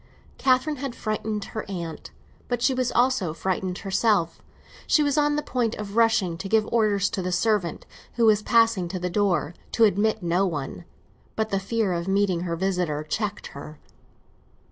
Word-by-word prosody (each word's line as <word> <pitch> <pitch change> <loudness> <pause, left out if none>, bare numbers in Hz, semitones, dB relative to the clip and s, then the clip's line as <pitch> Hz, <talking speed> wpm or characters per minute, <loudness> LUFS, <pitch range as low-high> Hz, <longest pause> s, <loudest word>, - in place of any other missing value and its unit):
Catherine 265 +3 +2
had 265 -2 -5
frightened 215 -1 -3
her 220 - -3
aunt, 170 -4 -6 0.4
but 245 -1 -2
she 265 - +3
was 255 -1 0
also 240 -10 +1
frightened 185 +2 -2
herself; 195 -4 +1 0.5
she 305 - +4
was 285 -1 +1
on 295 -1 +2
the 300 - -1
point 240 -3 -1
of 205 -1 -7
rushing 220 -7 +2
to 195 - -5
give 220 0 +3
orders 210 -4 +2
to 200 - -2
the 180 0 -2
servant, 180 -2 0 0.3
who 235 - +2
was 215 -1 +5
passing 225 -5 +3
to 185 +2 -4
the 180 0 -3
door, 175 -6 +1 0.2
to 230 - +3
admit 215 0 +2
no 175 +3 +2
one; 155 +1 -5 0.5
but 220 0 -1
the 195 - +1
fear 200 0 -1
of 170 +1 -3
meeting 195 -2 +2
her 170 -1 -2
visitor 180 -4 -1
checked 205 +6 -3
her. 150 +2 -9
205 Hz, 175 wpm, -25 LUFS, 180-230 Hz, 0.5 s, was